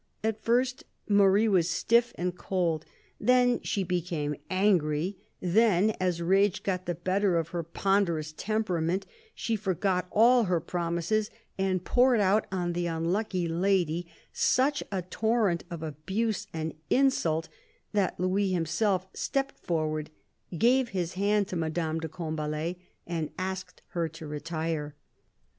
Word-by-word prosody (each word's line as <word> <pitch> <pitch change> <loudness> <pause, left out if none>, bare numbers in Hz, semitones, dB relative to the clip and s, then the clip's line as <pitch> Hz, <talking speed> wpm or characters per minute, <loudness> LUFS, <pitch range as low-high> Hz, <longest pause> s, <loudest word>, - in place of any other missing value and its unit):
At 220 -1 -1
first 250 +3 +1 0.2
Marie 200 +1 +5
was 180 -5 +3
stiff 235 +7 +3
and 180 0 -2
cold; 170 -4 -1 0.3
then 250 -1 +3
she 200 - -1
became 170 -5 -2
angry; 185 -2 +2 0.2
then, 205 +2 +3
as 180 -2 0
rage 195 +2 +3
got 185 -2 -2
the 175 - -1
better 185 +2 +1
of 165 -1 -1
her 170 0 -2
ponderous 170 -2 0
temperament, 190 -4 -1 0.3
she 230 - -1
forgot 190 -2 0
all 235 +2 +5
her 180 -2 +1
promises 170 +5 -1 0.3
and 185 -2 0
poured 250 -1 +4
out 205 +2 +3
on 175 -2 -1
the 175 0 -1
unlucky 175 +3 -1
lady 175 -1 +1 0.3
such 280 +3 +2
a 190 -2 -2
torrent 210 -2 0
of 170 -2 -6
abuse 190 +8 -2
and 160 -1 -3 0.2
insult 170 - +2 0.5
that 200 -5 0
Louis 190 +2 +1
himself 185 +3 +1
stepped 275 0 -2
forward, 155 -2 -2 0.5
gave 250 +5 +3
his 180 -4 -2
hand 200 +1 +1
to 185 - -4
Madame 160 -1 -1
de 160 0 -4
Combalet, 155 +1 -3 0.3
and 165 -3 -3
asked 185 0 -5
her 170 -2 -1
to 160 +1 -10
retire. 150 0 -3
180 Hz, 135 wpm, -28 LUFS, 165-205 Hz, 0.5 s, Marie